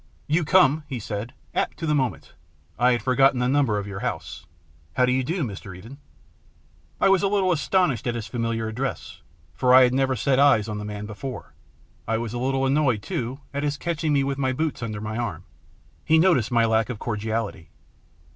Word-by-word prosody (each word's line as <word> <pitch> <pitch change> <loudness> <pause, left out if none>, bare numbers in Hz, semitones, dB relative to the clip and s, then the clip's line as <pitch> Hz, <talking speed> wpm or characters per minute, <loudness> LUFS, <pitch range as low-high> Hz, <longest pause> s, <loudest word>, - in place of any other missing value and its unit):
" - - -35
You 170 - +2
come," 155 -2 +4
he 135 - -4
said, 110 +3 -5
" - - -34
apt - - -1
to 165 - -4
the 150 - +1
moment. 130 -4 -2 0.5
I 125 +1 +4
had 120 -3 -2
forgotten 135 +1 +4
the 125 - +1
number 135 -5 +2
of 100 - -3
your 100 -1 -6
house. - - -5 0.5
How 125 - +4
do 125 - +1
you 130 +1 +1
do, 170 +5 -2
Mr. 100 -5 -7
Eden? 120 +9 -12 0.5
" - - -35
I - - +4
was 195 -2 +4
a 200 - +2
little 195 -2 +2
astonished 150 - +1
at 120 - -1
his 115 -2 -4
familiar 115 -1 -2
address, 125 +5 -5 0.3
for 125 -1 +4
I 130 - +9
had 125 0 +3
never 135 0 +1
set 130 +4 +1
eyes 140 -7 +4
on 105 -1 -4
the 105 - -6
man 105 0 -6
before. 110 +5 -7 0.5
I 110 0 +1
was 115 -1 -4
a 120 - -3
little 135 +1 0
annoyed, 135 -6 +1
too, 135 -6 -4
at 140 - -2
his 145 -1 -1
catching 160 -1 -2
me 140 -1 +3
with 135 0 -2
my 130 -1 +1
boots 155 +1 -2
under 110 -3 -4
my 110 +1 -4
arm. 95 -8 -4 0.6
He 160 - +4
noticed 160 - +3
my 120 -2 +3
lack 110 0 +1
of 125 - -4
cordiality. 110 -6 -3
125 Hz, 215 wpm, -24 LUFS, 110-140 Hz, 0.6 s, I